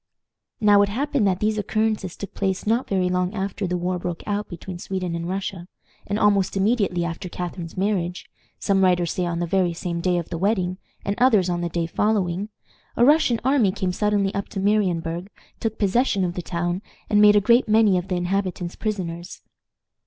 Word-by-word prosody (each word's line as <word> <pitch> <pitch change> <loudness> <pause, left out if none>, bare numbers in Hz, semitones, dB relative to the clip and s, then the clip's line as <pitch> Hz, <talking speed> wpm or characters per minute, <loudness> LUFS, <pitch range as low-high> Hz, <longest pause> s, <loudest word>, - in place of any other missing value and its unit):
Now 205 -1 +6
it 200 - +2
happened 270 0 0
that 185 -1 +1
these 215 0 +1
occurrences 215 -3 -1
took 200 - -7
place 190 -2 -1
not 230 +4 +1
very 185 -2 +1
long 180 +2 0
after 195 0 -2
the 180 0 -1
war 180 +1 -2
broke 175 -1 -4
out 205 0 -2
between 175 0 -7
Sweden 185 -2 -3
and 170 +1 -3
Russia, 190 -2 -4 0.4
and 205 - -1
almost 200 -2 +2
immediately 195 -4 +1
after 170 +2 -5
Catharine's 175 -1 -6
marriage 185 -3 -1 0.3
some 195 -1 +2
writers 180 -2 +2
say 180 -1 -1
on 170 -1 -2
the 175 - -1
very 180 0 +1
same 170 0 -4
day 180 0 +1
of 170 - -4
the 170 - -4
wedding, 185 -2 0 0.3
and 200 - 0
others 215 -8 +4
on 175 0 -1
the 175 - -2
day 170 0 -1
following 195 +1 0 0.5
a 240 - +5
Russian 285 -5 +4
army 260 -7 +3
came 185 -1 -2
suddenly 205 0 +1
up 200 -1 -3
to 195 - -5
Marienburg, 185 -3 0 0.3
took 220 -1 -2
possession 200 -1 +2
of 175 - -2
the 180 - -4
town, 175 +2 -2 0.3
and 210 0 +4
made 210 0 +7
a - - +7
great 235 +3 +3
many 215 -2 +5
of 180 - -8
the 185 - -1
inhabitants 180 -1 -2
prisoners. 175 -5 -4
190 Hz, 195 wpm, -23 LUFS, 175-210 Hz, 0.5 s, made